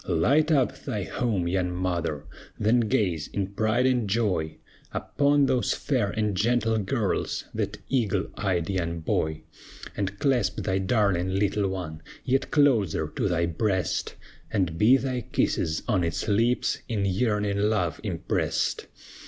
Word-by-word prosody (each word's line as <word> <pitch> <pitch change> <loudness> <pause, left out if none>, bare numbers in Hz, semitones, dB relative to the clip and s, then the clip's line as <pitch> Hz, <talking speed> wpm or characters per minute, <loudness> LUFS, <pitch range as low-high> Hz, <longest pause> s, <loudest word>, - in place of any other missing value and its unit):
Light 145 - +3
up 135 -5 +2
thy 110 -8 -3
home, 105 -5 -1
young 90 0 0
mother! 85 -5 -2 0.4
Then 110 +4 +3
gaze 95 -8 0
in 100 -1 -3
pride 110 +4 +1
and 125 -5 +1
joy 95 -8 0 0.3
Upon 145 0 +2
those 125 -2 +1
fair 125 -8 0
and 105 -1 -1
gentle 115 +1 +2
girls, 105 +1 -1
That 105 -1 -2
eagle 105 -7 +1
eyed 95 -5 -1
young 85 -3 -2
boy; 80 0 -1 0.5
And 100 0 -3
clasp 130 +2 +1
thy 95 -1 0
darling 95 -3 +1
little 100 0 +1
one 85 -5 -5 0.2
Yet 135 +1 +1
closer 105 - +2
to 100 - 0
thy 85 -1 +1
breast, 95 +2 -1 0.3
And 90 -5 0
be 115 +10 +5
thy 130 -2 -2
kisses 80 -6 -1
on 95 -4 +2
its 85 -2 -2
lips 115 +4 +1
In 105 -4 -1
yearning 105 0 0
love 100 -6 0
impressed. - - -1
100 Hz, 140 wpm, -26 LUFS, 90-120 Hz, 0.5 s, be